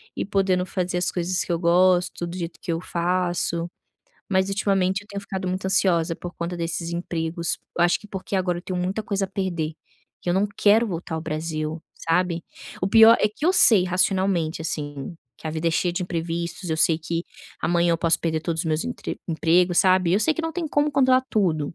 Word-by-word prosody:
e - - -2
podendo 190 -2 +1
fazer 180 -1 -2
as 175 - 0
coisas 180 +1 -1
que - - -5
eu 170 - 0
gosto 175 0 +3
do 175 +2 -6
jeito 170 -1 -6
que 170 - -3
eu 165 - -1
faço, 175 -1 -1 0.6
mas 190 -1 +1
ultimamente 195 -1 +1
eu 205 - -19
tenho 200 -1 -5
ficado 190 -2 -4
muito 185 +1 -3
ansiosa 175 -4 +2
por 175 0 -8
conta 170 +1 -4
desses 165 0 -3
empregos, 170 -1 -1 0.2
eu - - +4
acho 175 - +3
que 210 - -13
porque 195 0 -4
agora 180 -2 0
eu 175 - -9
tenho 185 -1 -4
muita 190 +4 -2
coisa 200 -3 -1
a - - -22
perder, 175 -5 -2 0.5
que - - -6
eu 175 - +1
não 200 +2 +2
quero 215 +3 +4
voltar 175 -4 -5
ao - - -3
Brasil, 155 0 -4
sabe. 170 0 0 0.4
O 185 - +1
pior 225 +2 +8
é 210 - +3
que 215 +8 -8
eu 365 - +4
sei 215 - +6
racionalmente, 185 -3 +1
assim, 145 -2 -5 0.2
que - - -9
a - - -2
vida 160 +1 -1
é - - 0
cheia 175 +2 0
de 180 +2 -2
imprevistos, 170 0 -4
eu 160 - 0
sei 160 0 +3
que 165 +1 -3 0.4
amanhã 170 0 +2
eu 165 - 0
posso 165 -1 +3
perder 160 -1 -1
todos 165 -1 -2
os - - -9
meus 155 0 0
emp 245 - -5 0.3
emprego, 175 +2 +2
sabe, 185 -1 +4
eu 200 - +4
sei 220 - +3
que - - -2
não 325 0 -3
tem 345 -1 -3
como 290 +1 +1
controlar 260 -2 +4
tudo, 165 -9 0
175 Hz, 220 wpm, -24 LUFS, 165-190 Hz, 0.6 s, pior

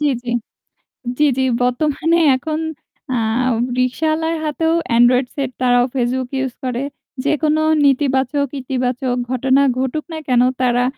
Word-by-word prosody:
জ্বি, 300 - +1 0.2
জ্বি। 240 -1 -3 0.9
জ্বি, 300 - +4
জ্বি 265 - +2 0.2
বর্তমানে 305 +6 +1 0.2
এখন 305 +4 -3 0.5
অ্যাঁ 235 +1 0 0.3
রিক্শাওয়ালার 315 +6 0
হাতেও 320 +2 0 0.2
এন্ড্রয়েড 250 +2 +4
সেট 275 -2 -2
তারাও 245 -1 +4
ফেসবুক 255 0 -1
ইউস 265 -2 -2
করে। 255 0 -2 0.4
যেকোনো 305 +1 +1 0.2
নেতিবাচক 275 0 +2
ইতিবাচক 250 -1 -1
ঘটনা 260 +2 +2 0.2
ঘটুক 265 +4 -2
না 315 - -4
কেন 250 -2 +3 0.2
তারা 245 0 +2
260 Hz, 125 wpm, -18 LUFS, 250-300 Hz, 0.9 s, জ্বি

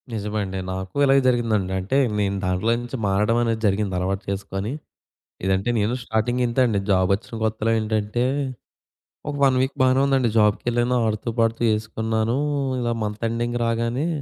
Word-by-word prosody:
నిజమండి. 105 -3 -3
నాకు 95 0 -6
ఇలాగే 135 0 +5
జరిగిందండి. 115 -6 +1
అంటే 100 +9 -1 0.2
నేను 100 -1 0
దాంట్లో 90 +5 +1
నుంచి 120 +2 -6
మారడమనేది 110 +3 +1
జరిగిందలవాటు 95 -1 -1
చేసుకొని. 100 +2 -3 0.7
ఇదంటే 95 +4 +1
నేను 105 +3 +1
స్టార్టింగింతే 120 +3 0
అండి. 105 -4 0
జాబ్ 95 -1 +3
ఒచ్చిన 115 +3 -10
కొత్తలో 110 0 0
ఏంటంటే 110 +2 -1 1.1
ఒక 145 - -3
1 130 -1 +3
వీక్ 130 +1 -1
బానే 130 0 +4
ఉందండి. 135 -3 +2
జాబ్‌కెళ్ళాను, 120 +3 +2
ఆడుతూ 110 +1 -2
పాడుతూ 115 0 +1
చేసుకున్నాను. 110 +2 -1 0.4
ఇలా 120 -1 0
మంత్ 105 +1 -4
ఎండింగ్ 120 +1 -2
రాగానే 115 +5 0
110 Hz, 135 wpm, -23 LUFS, 100-120 Hz, 1.1 s, ఇలాగే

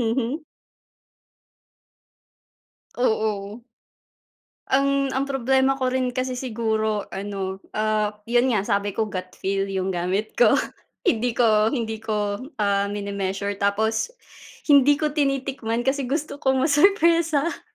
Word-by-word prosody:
Mhm. 245 +6 -1 2.5
Oo. 215 -3 -1 1.1
Ang 275 0 +2
ang 270 +1 0
problema 265 0 +2
ko 255 -1 0
rin 255 -1 -1
kasi 255 0 -1
siguro 220 -4 -1
ano, 195 -1 -4 0.2
ah, 215 -1 0
yun 240 +3 +2
nga, 215 -5 +2
sabi 200 -2 0
ko 220 -2 -1
gut 185 -2 -6
feel 195 0 -1
yung 190 -1 -2
gamit 185 +5 -1
ko. - - +6 0.5
Hindi 240 +1 +1
ko 220 -3 +4
hindi 225 -4 -3
ko, 210 -2 -2 0.2
ah, 200 -1 +1
mini-measure, 200 -1 -3
tapos 220 - 0 0.6
hindi 285 0 +7
ko 305 0 -1
tinitikman 275 -5 -1
kasi 270 -1 0
gusto 285 0 -3
ko 265 0 +2
masurpresa. 330 +1 +3
225 Hz, 115 wpm, -23 LUFS, 205-270 Hz, 2.5 s, hindi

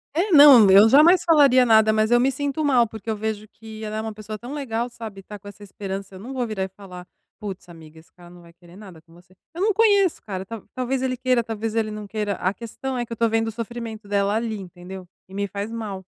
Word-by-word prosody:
É, 375 +4 0
não, 280 - +8
eu 205 +3 +7
jamais 325 +7 +6
falaria 280 -6 +5
nada, 220 -1 +4
mas 215 +1 +1
eu 240 - +5
me 265 +2 +2
sinto 285 +3 -3
mal, 250 -5 +3
porque 220 0 -9
eu 220 - -1
vejo 215 0 -4
que 220 0 -12
ela 215 0 -5
é - - -2
uma 220 -1 -6
pessoa 215 0 -8
tão 245 +6 -9
legal, 245 -4 -3
sabe, 220 -4 -9
e - - -13
tá 210 +1 -10
com 205 +1 -16
essa 205 +1 -12
esperança, 195 -1 -7
eu - - -10
não 255 +6 -8
vou 250 -2 -2
virar 205 -3 -3
e - - -3
falar: 185 -2 -12 0.3
"Putz, 190 -3 -8
amiga, 160 -1 -14
esse 160 - -22
cara 175 -1 -17
não 175 0 -15
vai 170 0 -18
querer 175 0 -19
nada 190 -6 -13
com 165 0 -24
você". 180 +2 -21 0.2
Eu 350 - -6
não 425 0 +2
conheço 405 -4 +3
o - - -52
cara, 190 -3 -6
ta 225 0 -8
talvez 255 +1 -2
ele 255 -1 -1
queira, 255 -2 +1
talvez 225 0 -5
ele 220 -1 -1
não 210 -1 -7
queira, 210 -1 -3
a 185 +2 -2
questão 250 +4 -6
é 240 - -2
que 230 - -24
eu - - -3
estou 230 0 +1
vendo 225 0 0
o - - -3
sofrimento 230 -1 -7
dela 200 0 0
ali, 225 -1 -2
entendeu? 180 0 -10 0.2
E 190 - -17
me 200 0 -2
faz 200 +3 -6
mal. 210 -4 -6
220 Hz, 265 wpm, -22 LUFS, 195-240 Hz, 0.3 s, não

